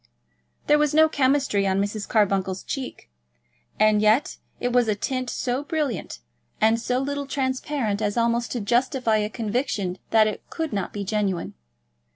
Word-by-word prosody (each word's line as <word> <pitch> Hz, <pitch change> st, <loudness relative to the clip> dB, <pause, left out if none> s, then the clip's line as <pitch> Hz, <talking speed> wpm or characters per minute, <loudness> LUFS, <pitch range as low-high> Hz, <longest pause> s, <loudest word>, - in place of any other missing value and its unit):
There 295 Hz, 0 st, +4 dB
was 300 Hz, 0 st, +1 dB
no 315 Hz, 0 st, +7 dB
chemistry 270 Hz, -8 st, +1 dB
on 190 Hz, 0 st, +1 dB
Mrs. 205 Hz, +1 st, -2 dB
Carbuncle's 195 Hz, -3 st, +1 dB
cheek; 265 Hz, -2 st, -6 dB, 0.7 s
and 215 Hz, -1 st, +4 dB
yet 215 Hz, +6 st, +3 dB, 0.2 s
it 245 Hz, 0 st, -1 dB
was 245 Hz, -2 st, +4 dB
a 215 Hz, -, +1 dB
tint 255 Hz, +4 st, -2 dB
so 255 Hz, +3 st, -2 dB
brilliant 295 Hz, -, -3 dB, 0.4 s
and 225 Hz, +1 st, +3 dB
so 250 Hz, +1 st, 0 dB
little 280 Hz, +1 st, -2 dB
transparent, 260 Hz, -5 st, -1 dB
as 205 Hz, +1 st, -1 dB
almost 235 Hz, 0 st, +1 dB
to 240 Hz, -, -2 dB
justify 240 Hz, +1 st, +1 dB
a 210 Hz, 0 st, -1 dB
conviction 215 Hz, -5 st, -2 dB
that 220 Hz, -1 st, +5 dB
it 215 Hz, -, -3 dB
could 320 Hz, -3 st, -3 dB
not 200 Hz, -3 st, -2 dB
be 205 Hz, -, -4 dB
genuine. 195 Hz, -3 st, -1 dB
230 Hz, 160 wpm, -24 LUFS, 210-265 Hz, 0.7 s, no